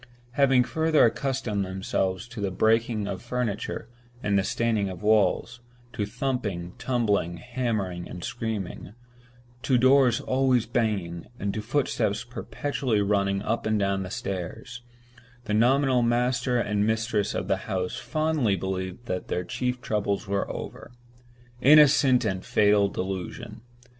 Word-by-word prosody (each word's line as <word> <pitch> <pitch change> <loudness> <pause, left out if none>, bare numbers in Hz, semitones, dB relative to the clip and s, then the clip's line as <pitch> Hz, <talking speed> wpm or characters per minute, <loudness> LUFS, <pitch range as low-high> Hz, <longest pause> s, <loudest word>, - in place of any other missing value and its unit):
Having 135 -1 +4
further 160 +4 +3
accustomed 120 -4 -1
themselves 95 +2 -2
to 115 -3 -7
the 100 - 0
breaking 110 +2 +1
of - - -4
furniture 120 -3 -3 0.4
and 100 -1 +1
the 100 - +3
staining 110 -2 0
of 95 +2 -8
walls—to 120 +2 0
thumping, 105 -9 -3
tumbling, 110 -8 0
hammering, 105 -5 -3
and 90 - -8
screaming; 110 -4 -4 0.7
to 130 -1 +2
doors 130 -1 +5
always 130 -2 +2
banging, 95 -8 -2
and 100 0 -2
to 110 - -3
footsteps 110 -3 0
perpetually 125 -1 -2
running 100 -1 +1
up 110 +1 -1
and 110 0 +2
down 100 -2 -1
stairs—the 120 +3 -7
nominal 130 +3 +3
master 125 +1 +1
and 105 -2 0
mistress 110 -2 0
of - - -2
the - - +1
house 90 -1 -2
fondly 155 -9 0
believed 95 +3 -4
that 90 -5 -3
their 90 - -2
chief 125 +7 -3
troubles 105 -3 -1
were 100 0 -1
over. - - -8 0.7
Innocent 140 -3 +6
and 95 -3 -2
fatal 105 -1 +3
delusion! 95 +3 -5
110 Hz, 130 wpm, -26 LUFS, 100-125 Hz, 0.7 s, Innocent